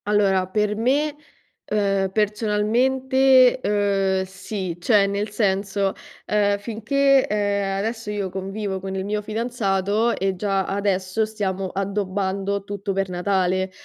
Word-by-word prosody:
Allora, 195 -3 +2
per 210 +2 0
me, 280 +7 +1 0.5
ehm, 195 -2 0
personalmente, 245 +6 +3
uhm, 195 -3 +1
sì, 190 -1 -5
cioè 200 +2 +4
nel 200 +2 -2
senso, 195 -1 0 0.3
uhm, 205 -1 +2
finché, 260 +6 +2
ehm, 200 -1 0
adesso 225 +2 -3
io 200 -3 -3
convivo 195 +1 -4
con 190 0 -5
il 190 0 -3
mio 210 +1 -1
fidanzato 215 -1 0
e 195 0 0
già 195 0 0
adesso 195 +1 0
stiamo 195 -3 -3
addobbando 195 0 -2
tutto 200 0 -4
per 195 0 -1
Natale, 185 0 0
200 Hz, 120 wpm, -23 LUFS, 195-215 Hz, 0.5 s, cioè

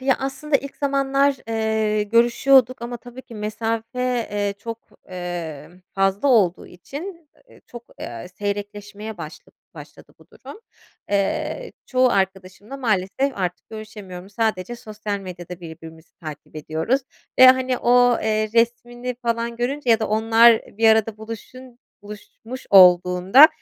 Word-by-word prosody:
Ya, 265 0 +2
aslında 280 +2 -1
ilk 280 +1 -9
zamanlar, 275 0 +1
eee, 220 -1 0
görüşüyorduk, 240 +3 +3
ama 240 +1 -5
tabii 245 +2 -12
ki 235 - -13
mesafe, 230 +3 -2
eee, 205 -1 -1
çok, 230 +2 -6 0.3
emm, 175 -2 -7
fazla 195 +7 +1
olduğu 200 -8 +3
için, 310 - -9 0.2
eee, - - -19
çok, 240 -1 -10 0.2
eee, 115 +4 -7
seyrekleşmeye 205 +1 -5
başla 155 -1 -10 0.2
başladı - - -13
bu - - -20
durum. 430 - -12 0.5
Eee, 310 - -1
çoğu 255 0 +3
arkadaşımla 195 +4 -3
maalesef 230 +3 0
artık 180 -2 -4
görüşemiyorum, 205 -4 -9
sadece 220 +1 -2
sosyal 210 -2 -5
medyada 180 -2 -9
birbirimizi 160 -1 -12
takip 155 -1 -10
ediyoruz 160 - -1 0.4
ve 260 - +10
hani, 255 -1 +4
o, 245 0 +4
eee, 215 0 0
resmini 240 +1 0
falan 235 0 -2
görünce 255 +1 -1
ya 225 - +4
da 220 - -1
onlar 225 +1 +5 0.2
bir 225 0 +5
arada 220 -1 +3
buluşun 235 +3 -10 0.2
buluşmuş 215 +4 -10
olduğunda, 180 - +7
220 Hz, 130 wpm, -22 LUFS, 195-250 Hz, 0.5 s, ve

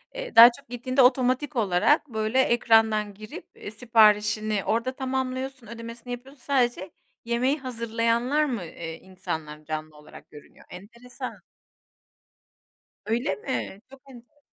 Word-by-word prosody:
eee, - - -7
daha 235 +1 +11
çok 280 - -23
gittiğinde 255 +2 0
otomatik 255 +3 +2
olarak, 220 - +2
böyle, 220 +2 0
ekrandan 225 -4 +2
girip, 215 +2 -11
eee, 205 - -9
siparişini 215 -2 +2
orda 230 +3 0
tamamlıyorsun, 260 -1 -4
ödemesini 230 +2 -9
yapıyorsun. 260 +2 -11
Sadece 240 -9 0 0.3
yemeği 250 +5 0
hazırlayanlar 235 +3 0
mı, 240 -9 -3
eee, 165 0 -8
insanlar 160 -5 -7
canlı 155 0 -6
olarak 150 0 -15
görünüyor? 145 - -16
Enteresan. 240 +7 -9 1.7
Öyle 225 -3 -1
mi? 205 -2 -5
Çok 270 0 -15
enteresan. 245 +3 -17
235 Hz, 120 wpm, -25 LUFS, 210-255 Hz, 1.7 s, daha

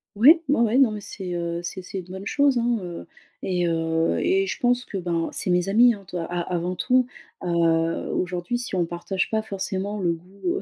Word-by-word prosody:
Ouais, 295 - +7
ouais, 275 -4 +3
ouais. 230 +1 +3
Non 265 -5 +5
mais 210 -1 -5
c'est, 190 -3 -6
heu, 170 0 -2
c'est-c'est 185 +2 -6
une 180 - -8
bonne 190 +2 -8
chose, 280 +2 +3
hein, 240 0 +1
heu, 175 -1 -7 0.4
et, 180 -2 0
heu, 165 0 +1
et 390 +1 +2
je - - -3
pense 245 0 +2
que 200 - -5
ben, 170 -2 -1
c'est - - -3
mes 180 +1 +2
amies, 235 +4 +6
hein, 200 -2 -11
to - - -9
a 170 - -2
avant 175 +1 -2
tout. 255 +6 +3 0.4
Heu, 175 - -2 0.6
aujourd'hui 180 +5 -1
si 240 -5 -4
on 175 -2 +2
partage 175 +3 -2
pas 220 0 +1
forcément 200 0 -3
le 175 -3 +1
goût, 180 +4 -14
heu, 390 - -3
190 Hz, 215 wpm, -24 LUFS, 175-235 Hz, 0.6 s, Ouais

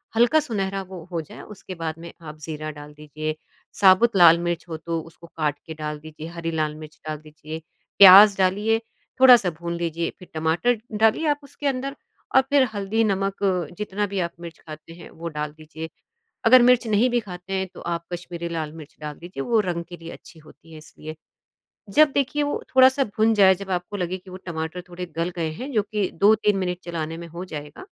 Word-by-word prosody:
हल्का 240 +7 +5
सुनहरा 195 -8 -2
वो 185 -3 -10
हो 165 -2 -2
जाए, 155 - -12
उसके 190 -3 -10
बाद 160 -1 -4
में 170 0 -9
आप 155 -1 -9
ज़ीरा 155 0 -6
डाल 150 0 -11
दीजिए, 155 +1 -5 0.4
साबुत 200 +3 +5
लाल 170 -1 +8
मिर्च 175 0 -2
हो 160 - -4
तो 165 0 -3
उसको 165 +1 -15
काट 150 -3 -2
के 160 - -6
डाल 150 -1 -5
दीजिए, 155 +1 -10
हरी 170 -1 -5
लाल 155 -1 -1
मिर्च 155 0 -12
डाल 155 -1 -3
दीजिए, 155 +1 -9 0.4
प्याज़ 200 +1 +10
डालिए, 205 +4 +2 0.4
थोड़ा-सा 240 -8 +8
भून 170 0 -4
लीजिए 170 0 -2
फिर 180 - -13
टमाटर 165 +10 +1 0.2
डालिए 225 +9 +3
आप 290 -1 +1
उसके 280 +1 -6
अंदर 275 +1 -2 0.4
और 265 - +8
फिर 280 -2 +5
हल्दी, 205 +3 0
नमक 195 -1 0 0.4
जितना 210 0 -2
भी 195 -1 -3
आप 170 -1 -1
मिर्च 170 -1 -9
खाते 155 +1 -11
हैं 170 - -12
वो 170 +1 -8
डाल 150 -1 -4
दीजिए। 160 +1 -9 0.6
अगर 250 +2 +8
मिर्च 250 -1 +5
नहीं 220 +4 +3
भी 240 0 +1
खाते 185 -2 -8
हैं 190 0 -1
तो - - -11
आप 170 0 -3
कश्मीरी 170 -1 -5
लाल 160 -2 -3
मिर्च 155 -2 -12
डाल 150 -1 -6
लीजिए 175 -6 -6
वो 230 -2 +2
रंग 175 -3 -3
के 175 - -9
लिए 165 +1 -10
अच्छी 165 - -14
होती 160 +1 -18
है - - -10
इसलिए। 155 0 -10 0.8
जब 305 -2 +6
देखिए 290 +1 0
वो 290 - -2
थोड़ा-सा 260 +1 +6
भुन 220 +1 +3
जाए, 190 -2 +6
जब 195 +1 -9
आपको 180 +3 -3
लगे 185 0 -3
कि 185 0 -15
वो 185 - -8
टमाटर 160 +1 -4
थोड़े 180 +1 -6
गल 170 +2 -1
गए 160 -2 -1
हैं 255 - -7
जो 215 -3 +2
कि 210 -2 -2
2-3 210 +2 +3
मिनट 180 -1 -2
चलाने 165 -2 -4
में 170 - -8
हो 170 +3 -7
जाएगा, 150 - -9
175 Hz, 205 wpm, -23 LUFS, 160-210 Hz, 0.8 s, प्याज़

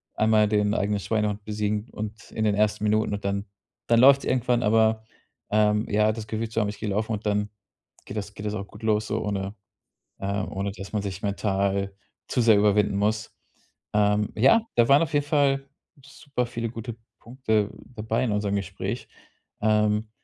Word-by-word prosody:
einmal 110 -1 +4
den 105 0 +1
eigenen 105 -1 0
Schweinehund 105 0 -1
besiegen 105 +1 -2
und 105 +1 -7
in 110 - -2
den 105 -1 +2
ersten 105 0 +1
Minuten 105 0 +1
und 100 0 -4
dann 100 +1 -1 0.4
dann 115 0 +4
läuft's 140 +1 +6
irgendwann. 125 -1 +1
Aber, 110 0 +3 0.5
ähm, 105 +1 +2
ja, 105 +1 +3
das 110 -1 -6
Gefühl 110 0 -3
zu 115 - -1
haben, 105 - +1
ich 105 - -6
gehe 105 - -3
laufen 110 +3 -1
und 105 +1 -5
dann 105 0 0 0.6
geht - - -7
das 105 0 -5
geht 105 - -8
das 105 - -2
auch 100 -1 -5
gut 105 +2 -15
los 110 -1 +1
so, - - -2
ohne, 100 0 -3 0.6
ähm 100 0 -2
ohne 100 +1 -2
dass 95 +2 -9
man 105 - 0
sich 95 -1 -5
mental 100 -1 -1 0.4
zu 125 - +1
sehr 110 -3 +6
überwinden 105 -1 +3
muss. 105 +1 -1 0.6
Ähm, 105 0 +2
ja, 135 - +5
da 120 -1 +4
waren 140 +2 +7
auf 160 - -4
jeden 145 -1 +2
Fall 140 -2 +1 0.4
super 140 -3 -4
viele 115 -1 -4
gute 115 0 -6 0.2
Punkte 110 -4 -1 0.3
dabei 110 +3 -1
in 115 - 0
unserem 105 -1 0
Gespräch. 95 -1 -4 0.5
Ähm, 105 0 +2
105 Hz, 185 wpm, -25 LUFS, 105-115 Hz, 0.6 s, waren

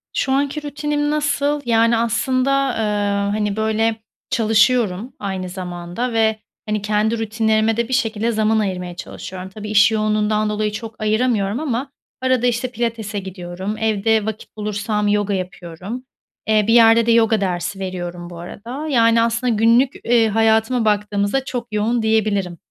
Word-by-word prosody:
Şu 265 - 0
anki 285 +2 0
rutinim 295 0 -2
nasıl? 295 -1 0
Yani, 230 0 +3
aslında, 255 +4 +1 0.2
ııı, 205 -3 0
hani, 210 -1 -1
böyle, 220 0 0 0.3
çalışıyorum 225 -1 +2
aynı 190 -2 -4
zamanda 180 +5 -5
ve, 220 -1 +2 0.3
hani, 210 -1 -1
kendi 215 +2 0
rutinlerime 220 0 +1
de 235 -1 0
bir 260 - -4
şekilde 225 -2 0
zaman 220 0 +2
ayırmaya 180 -3 -3
çalışıyorum. 185 +1 -8
Tabii, 210 +2 -8
iş 210 +1 +5
yoğunluğundan 215 0 +1
dolayı 210 0 -1
çok 220 +1 -7
ayıramıyorum 215 0 +1
ama 275 -2 -2 0.3
arada, 255 -2 +2
işte, 245 +1 -1
pilatese 225 -3 -3
gidiyorum, 190 +2 -6
evde 220 0 +1
vakit 220 0 -7
bulursam 210 0 -1
yoga 205 0 +1
yapıyorum, 185 +5 -6 0.4
eee, 215 -1 +3
bir 225 - +4
yerde 230 -1 +6
de 235 - +3
yoga 225 -2 +3
dersi 185 +1 -2
veriyorum 175 -2 -5
bu 170 -1 -9
arada. 240 - -7
Yani, 230 -4 +4
aslında, 235 +1 +1
günlük, 230 +5 +3
eee, 235 -2 +3
hayatıma 225 +2 +2
baktığımızda 210 +4 0
çok 245 -2 -4
yoğun, 225 +3 +1
diyebilirim. 210 -5 0
220 Hz, 150 wpm, -20 LUFS, 205-235 Hz, 0.4 s, yerde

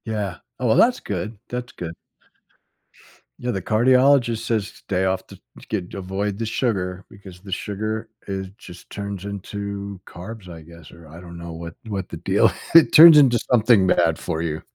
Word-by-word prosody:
Yeah, 105 -5 -3 0.2
oh 130 - -2
well, 110 - +4
that's 245 +1 +4
good, 105 +3 -5
that's 125 0 -5
good. 85 -1 -6 1.5
Yeah, 125 - -2
the 95 - -3
cardiologist 125 +2 +3
says 110 -3 0
stay 95 +2 -3
off 95 0 -1
the - - -12 0.2
to - - -16
get 95 -5 -4
avoid 95 +1 -3
the 115 - -3
sugar 95 -6 -2
because 95 -3 -13
the 95 +1 -12
sugar 110 +4 -3 0.2
is 95 -1 -4
just 90 0 -13
turns 100 -1 -6
into 100 0 -6
carbs, 95 +3 -10
I 85 -2 -10
guess? 85 -1 -15
Or, 85 -1 -15
I 80 +2 -12
don't 85 -1 -11
know 85 0 -8
what 85 0 -8
what 100 -4 -4
the - - -7
deal - - +2 0.2
it 165 - +7
turns 160 0 +10
into 130 -5 +5
something 110 -5 +4
bad 85 -3 +2
for 80 -2 -3
you. 80 -2 -3
100 Hz, 180 wpm, -22 LUFS, 90-110 Hz, 1.5 s, turns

